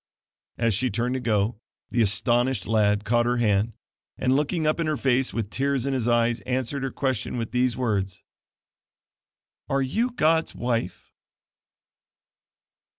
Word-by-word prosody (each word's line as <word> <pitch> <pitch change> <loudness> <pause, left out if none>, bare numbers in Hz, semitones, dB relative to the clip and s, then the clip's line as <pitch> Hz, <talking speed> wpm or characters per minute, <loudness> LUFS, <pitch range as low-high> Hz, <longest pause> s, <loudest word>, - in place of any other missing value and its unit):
As 115 -2 +1
she 125 +6 +1
turned 120 +4 -1
to 130 - -1
go, 110 -2 0 0.3
the 120 - +2
astonished 120 +1 +1
lad 105 -2 +2
caught 120 +2 +2
her 120 0 +1
hand, 110 -1 +1 0.4
and 130 0 +2
looking 150 +3 0
up 155 +2 +1
in 165 - 0
her 155 -1 0
face, 130 0 +1
with 110 -3 -3
tears 135 -1 0
in 140 - 0
his 125 -3 -1
eyes 120 0 +2
answered 130 +2 -2
her 135 - -1
question 130 -3 -2
with 115 -2 -3
these 125 -1 +1
words: 100 -7 -1 1.5
"Are 135 0 +1
you 225 - 0
God's 165 -8 +1
wife?" 115 -6 -3
120 Hz, 150 wpm, -25 LUFS, 115-135 Hz, 1.5 s, the